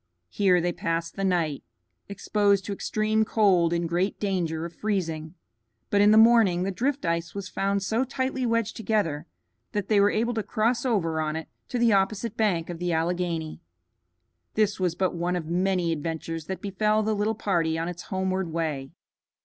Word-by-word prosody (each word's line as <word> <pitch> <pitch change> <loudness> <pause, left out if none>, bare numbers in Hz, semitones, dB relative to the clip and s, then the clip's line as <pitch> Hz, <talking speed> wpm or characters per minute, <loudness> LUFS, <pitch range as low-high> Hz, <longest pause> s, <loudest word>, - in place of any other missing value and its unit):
Here 185 - +3
they 175 +1 0
passed 165 0 -2
the 195 - -3
night, 170 -7 0 0.5
exposed 200 -1 +1
to 205 - -3
extreme 215 +2 0
cold, 190 -6 +3
in 170 0 0
great 175 +4 -1
danger 170 -5 -1
of 170 - -7
freezing; 165 -6 -3 0.6
but 200 - +4
in 205 - +6
the 215 - +6
morning 220 -6 +5
the 195 - -1
drift 265 +6 -1
ice 170 +1 -2
was 200 -2 -4
found 200 0 -1
so 225 +5 +1
tightly 260 0 -2
wedged 230 -2 0
together 205 -9 -1 0.5
that 205 -2 -2
they 210 -2 +4
were 205 - +5
able 230 +3 0
to 225 - -1
cross 230 +4 0
over 165 -9 0
on 155 0 -2
it 160 0 -5 0.2
to 250 - -3
the 235 -2 +4
opposite 200 +3 0
bank 185 -7 +1
of 175 -2 -6
the 175 0 -1
Alleghany. 165 -1 -1 0.9
This 210 -2 +1
was 180 -2 0
but 185 0 0
one 175 +1 -1
of 175 -3 -3
many 180 +1 0
adventures 165 0 -4
that 190 - -4
befell 210 +2 +1
the 215 +1 0
little 210 +2 0
party 170 -6 0
on 165 +1 -2
its 175 0 -6
homeward 190 -2 -1
way. 155 -5 -2
190 Hz, 180 wpm, -26 LUFS, 170-215 Hz, 0.9 s, in